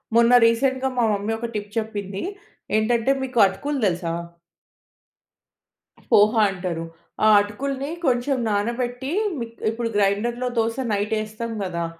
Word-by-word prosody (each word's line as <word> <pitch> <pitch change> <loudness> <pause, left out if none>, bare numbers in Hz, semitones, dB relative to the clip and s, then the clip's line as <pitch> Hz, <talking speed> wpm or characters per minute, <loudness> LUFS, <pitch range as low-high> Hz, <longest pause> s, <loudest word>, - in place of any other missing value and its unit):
మొన్న 235 +1 +5
రీసెంట్‌గా 260 +3 +2
మా 240 - +3
మమ్మీ 205 +2 -2
ఒక 235 - -3
టిప్ 205 0 -4
చెప్పింది. 205 -3 -3 0.5
ఏంటంటే 230 +3 +2
మీకు 255 -2 -2
అటుకులు 285 +8 -3
తెలుసా? 170 -3 -1 2.0
పోహ 210 +1 +6 0.2
అంటారు. 180 -3 -4 0.4
ఆ - - +6
అటుకుల్ని 270 +7 -4 0.2
కొంచెం 255 +1 +1
నానబెట్టి 240 +5 -2 0.3
మి 235 - -2 0.2
ఇప్పుడు 230 +1 -2
గ్రైండర్‌‌‌లో 220 +5 +1
దోస 230 0 +1 0.2
నైట్ 205 +1 -1
ఏస్తాం 215 +2 -6
గదా! 170 -3 -2
225 Hz, 120 wpm, -23 LUFS, 205-245 Hz, 2.0 s, పోహ